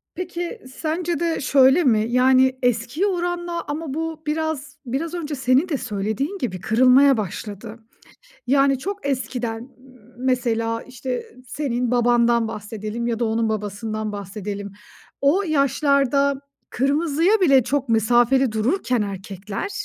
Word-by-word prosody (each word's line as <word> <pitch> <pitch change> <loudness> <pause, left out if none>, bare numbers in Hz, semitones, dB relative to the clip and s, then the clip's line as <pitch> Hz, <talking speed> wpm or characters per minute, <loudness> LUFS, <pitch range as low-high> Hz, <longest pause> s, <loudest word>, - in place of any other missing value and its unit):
Peki, 360 +4 -5
sence 335 +2 -2
de 335 -2 -1
şöyle 270 +4 +5
mi? 220 -6 +3
Yani 260 +1 +4
eskiye 245 - 0
oranla 350 -2 -2
ama 295 -1 -4
bu 320 0 -4
biraz 305 -2 -3
biraz 280 +7 -3
önce 310 -4 -4
senin 265 +6 +2
de 295 - 0
söylediğin 220 - -3
gibi 195 - -3
kırılmaya 255 +3 +5
başladı. 210 +3 -6 0.7
Yani 275 +1 +3
çok 395 +2 -5
eskiden, 245 -3 -3 0.5
mesela 230 -3 0
işte 250 -1 -6
senin 245 -2 -2
babandan 240 -1 +3
bahsedelim 215 +2 -5
ya 230 -1 -1
da 235 - 0
onun 225 0 0
babasından 215 0 -3
bahsedelim. 200 0 -6 0.5
O 300 +9 +3
yaşlarda 280 -2 +2 0.3
kırmızıya 310 - +2
bile 275 -8 +5
çok 275 0 -1
mesafeli 240 +3 +3
dururken 245 - 0
erkekler, 195 - -5
255 Hz, 120 wpm, -22 LUFS, 225-300 Hz, 0.7 s, şöyle